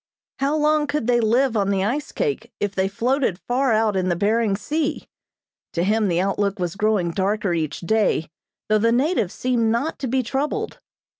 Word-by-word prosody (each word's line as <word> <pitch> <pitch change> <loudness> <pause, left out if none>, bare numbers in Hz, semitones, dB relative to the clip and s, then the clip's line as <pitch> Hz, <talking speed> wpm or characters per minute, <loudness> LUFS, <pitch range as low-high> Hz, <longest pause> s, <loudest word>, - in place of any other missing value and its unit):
How 280 +3 +1
long 305 0 +2
could 290 -4 -1
they 240 0 +3
live 235 +3 +2
on 200 -2 +1
the 195 -1 +1
ice 275 +9 -2
cake 445 -4 -2
if 205 -1 -1
they 190 0 +1
floated 245 0 0
far 245 +7 0
out 215 -2 +2
in 185 -1 0
the 175 - +1
Behring 210 +2 +1
Sea? 300 +8 -2 0.7
To 170 - 0
him 215 +2 +2
the 175 -2 +1
outlook 200 +2 0
was 175 -2 -3
growing 200 -4 +1
darker 200 +1 0
each 155 -3 -2
day, 200 -4 +1 0.4
though 215 0 +3
the 230 +2 +3
natives 255 - +1
seemed 240 -3 +1
not 275 +8 -1
to 265 - -3
be 260 +2 +1
troubled. 270 +5 -2
220 Hz, 190 wpm, -22 LUFS, 195-265 Hz, 0.7 s, they